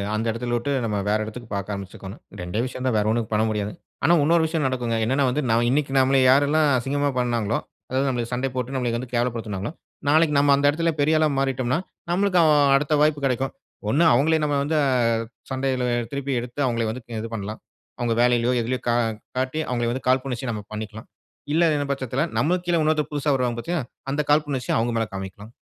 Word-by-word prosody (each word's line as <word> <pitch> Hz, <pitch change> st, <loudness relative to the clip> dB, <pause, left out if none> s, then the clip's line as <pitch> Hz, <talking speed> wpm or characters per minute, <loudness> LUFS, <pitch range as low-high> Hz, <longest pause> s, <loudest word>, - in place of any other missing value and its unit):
அந்த 110 Hz, +1 st, -1 dB
இடத்தில 120 Hz, +1 st, -2 dB
விட்டு 120 Hz, +5 st, -2 dB
நம்ம 105 Hz, -2 st, -1 dB
வேற 105 Hz, -, +3 dB
இடத்துக்கு 115 Hz, +2 st, -9 dB
பார்க்க 100 Hz, +1 st, -3 dB
ஆரம்பிச்சிக்கோணும். 95 Hz, +1 st, -9 dB, 0.2 s
2ஏ 90 Hz, +4 st, -4 dB
விஷயந்தான் 130 Hz, -1 st, -2 dB
வேற 105 Hz, -, +1 dB
ஒன்னும் 115 Hz, -1 st, -1 dB
பண்ண 105 Hz, +1 st, +3 dB
முடியாதுங்க. 105 Hz, -1 st, -3 dB, 0.3 s
ஆனா, 170 Hz, +4 st, +5 dB
இன்னொரு 165 Hz, +2 st, +3 dB
விஷயம் 160 Hz, -2 st, -1 dB
நடக்குங்க. 125 Hz, -3 st, -1 dB
என்னன்னா 135 Hz, +4 st, +2 dB
வந்து 130 Hz, +4 st, 0 dB
நான் 115 Hz, +1 st, +3 dB
இன்னைக்கு 140 Hz, +1 st, +1 dB
நம்மள 135 Hz, +1 st, +3 dB
யாரெல்லாம் 145 Hz, +3 st, +4 dB
அசிங்கமா 145 Hz, +3 st, 0 dB
பண்ணாங்களோ, 120 Hz, -3 st, 0 dB, 0.3 s
அதாவது 130 Hz, +2 st, 0 dB
நம்மளை 120 Hz, -2 st, -1 dB
சண்டை 130 Hz, +2 st, -1 dB
போட்டு, 125 Hz, +1 st, -3 dB
நம்மளை 125 Hz, -2 st, 0 dB
வந்து 125 Hz, 0 st, -7 dB
கேவலப்படுத்தினாங்களோ, 115 Hz, -3 st, -2 dB, 0.4 s
நாளைக்கு 155 Hz, 0 st, +4 dB
நம்ம 145 Hz, 0 st, +4 dB
அந்த 140 Hz, +1 st, 0 dB
இடத்தில 165 Hz, +3 st, +1 dB
பெரிய 155 Hz, +2 st, +3 dB
ஆளா 155 Hz, -, +4 dB
மாறிட்டம்ன்னா, 130 Hz, +1 st, 0 dB, 0.3 s
நம்மளுக்கு 185 Hz, 0 st, +2 dB
அ -, -, +5 dB, 0.3 s
அடுத்த 150 Hz, +2 st, +1 dB
வாய்ப்பு 150 Hz, -1 st, +2 dB
கிடைக்கும். 130 Hz, 0 st, 0 dB, 0.4 s
ஒண்ணு 145 Hz, +10 st, +3 dB
அவுங்களே 155 Hz, +6 st, +3 dB
நம்ம 145 Hz, -1 st, +1 dB
வந்து 155 Hz, +2 st, 0 dB, 0.7 s
சண்டையில 130 Hz, -1 st, -1 dB, 0.3 s
திருப்பி 140 Hz, 0 st, -3 dB
எடுத்து 120 Hz, +3 st, -7 dB
அவுங்களை 115 Hz, -2 st, 0 dB
வந்து 125 Hz, +4 st, -5 dB
க -, -, -37 dB
இது 115 Hz, -, -5 dB
பண்லாம். 105 Hz, 0 st, -5 dB, 0.4 s
அவுங்க 120 Hz, -1 st, 0 dB
வேலையிலோ, 120 Hz, 0 st, +3 dB
எதிலயோ 125 Hz, +2 st, -2 dB
கா 120 Hz, -, +3 dB, 0.4 s
காட்டி 130 Hz, +4 st, -1 dB
அவுங்கள 120 Hz, -2 st, 0 dB
வந்து 130 Hz, +2 st, -5 dB
காழ்புணர்ச்சிய 130 Hz, -1 st, 0 dB
நம்ம 105 Hz, -2 st, -5 dB
பண்ணிக்கலாம். 110 Hz, +1 st, -7 dB, 0.5 s
இல்லங்கிற 155 Hz, -3 st, +2 dB
பட்சத்தில 135 Hz, -1 st, -2 dB, 0.2 s
நம்மளுக்கு 175 Hz, +4 st, +1 dB
கீழ 175 Hz, -, +2 dB
இன்னொருத்தன் 155 Hz, -1 st, +1 dB
புதுசா 145 Hz, 0 st, 0 dB
வருவாங்க 125 Hz, -2 st, -1 dB
பாத்தியா! 170 Hz, +7 st, -2 dB, 0.3 s
அந்த 145 Hz, +2 st, 0 dB
காழ்புணர்ச்சிய 145 Hz, -4 st, +1 dB
அவுங்க 120 Hz, +1 st, 0 dB
மேல் 115 Hz, -1 st, -1 dB
காமிக்கலாம். 95 Hz, +3 st, -7 dB
130 Hz, 185 wpm, -23 LUFS, 115-145 Hz, 0.7 s, ஆனா